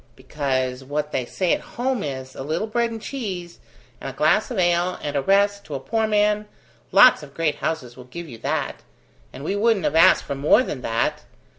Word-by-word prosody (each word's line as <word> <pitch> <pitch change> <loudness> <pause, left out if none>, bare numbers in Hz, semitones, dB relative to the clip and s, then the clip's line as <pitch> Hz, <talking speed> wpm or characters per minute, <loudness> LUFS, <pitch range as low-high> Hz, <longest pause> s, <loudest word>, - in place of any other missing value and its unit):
"Because, 130 -2 -2
what 150 +2 -3
they 125 - -1
say 185 -3 0
at - - -1 0.2
home 250 -1 0
is, 130 -4 -5
a - - -8
little 155 +9 -2
bread 235 +2 0
and 225 -1 -6
cheese, 190 -9 -6 0.4
and - - -4
a - - -8
glass - - +2
of 245 - -4
ale, 175 0 +2
and 145 -1 -3
a 140 - +2
rest, 200 +5 +2
to 150 - -6
a - - -3
poor 220 - -1
man 210 0 +2 0.4
lots 255 - +7
of 140 -2 -13
great 165 -3 0
houses 125 -7 -3
will 125 - -12
give 170 +7 -8
you 120 -6 -10
that, - - -2 0.5
and 135 - -10
we 195 - -1
wouldn't 210 -3 +2
have - - +1
asked 165 +4 +6
for 140 - -4
more 150 - +4
than 140 - -5
that. 115 -1 -1
165 Hz, 210 wpm, -23 LUFS, 135-210 Hz, 0.5 s, lots